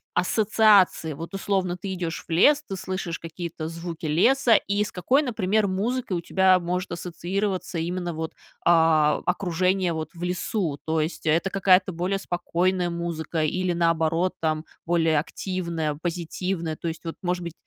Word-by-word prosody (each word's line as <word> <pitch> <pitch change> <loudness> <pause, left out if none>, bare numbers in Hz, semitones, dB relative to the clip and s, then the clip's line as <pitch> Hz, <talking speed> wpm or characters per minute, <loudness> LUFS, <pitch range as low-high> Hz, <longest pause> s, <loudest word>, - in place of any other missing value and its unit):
ассоциации? 200 -4 +3
Вот, 165 +6 -7
условно, 190 -2 -1
ты 190 +1 -5
идешь 175 -2 -4
в - - -10
лес, 290 - +5
ты 195 - -4
слышишь 185 -2 -4
какие-то 165 -1 -6
звуки 165 -1 -6
леса, 230 - +4
и 200 +1 +1
с 205 - -6
какой, 255 +11 +2
например, 215 -5 +1
музыкой 205 +1 -1
у - - -3
тебя 190 +1 +4
может 180 +1 -3
ассоциироваться 180 +2 -3
именно 175 +1 -2
вот, 160 0 -4 0.3
а, 160 -3 +4
окружение, 180 0 +1
вот, 155 -1 -4
в 170 - -7
лесу? 180 -3 -2
То 160 0 +1
есть 160 +1 -4
это 170 +5 +2
какая-то 190 -1 +4
более 180 +4 -1
спокойная 180 0 0
музыка 170 -2 -3
или, 180 +3 0
наоборот, 165 +1 +1
там, 155 0 -1 0.2
более 165 -3 +3
активная, 170 -3 -3
позитивная, 170 -1 -3
то 170 - -5
есть, 165 +1 -5
вот, 165 - -5
может 180 -1 -1
быть, 170 -1 -6
175 Hz, 155 wpm, -25 LUFS, 165-190 Hz, 0.3 s, лес